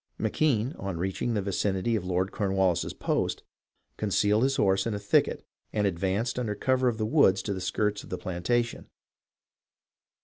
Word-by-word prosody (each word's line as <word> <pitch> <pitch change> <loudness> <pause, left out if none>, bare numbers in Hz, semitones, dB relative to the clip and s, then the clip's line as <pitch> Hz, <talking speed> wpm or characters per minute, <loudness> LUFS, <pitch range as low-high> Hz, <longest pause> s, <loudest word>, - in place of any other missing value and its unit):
McKenne, 130 -4 +1
on 95 -3 -4
reaching 95 +6 -2
the 100 - 0
vicinity 100 +3 0
of 105 - -1
Lord 90 +1 -1
Cornwallis's 95 -4 +1
post, - - -1 0.5
concealed 105 +1 +2
his 135 +1 +2
horse 95 -1 +2
in 110 - -1
a - - -3
thicket 100 0 +1 0.3
and 105 -1 0
ad 95 -4 0
vanced 100 +7 -1
under 110 -4 -2
cover 130 +1 +1
of 120 -3 +1
the 110 - -1
wood 125 -6 +5
to 100 +1 -3
the 95 - -5
skirts 105 +3 -1
of - - -13
the 90 - -3
planta 95 +8 0
tion. 120 - -11
105 Hz, 175 wpm, -28 LUFS, 95-115 Hz, 0.5 s, wood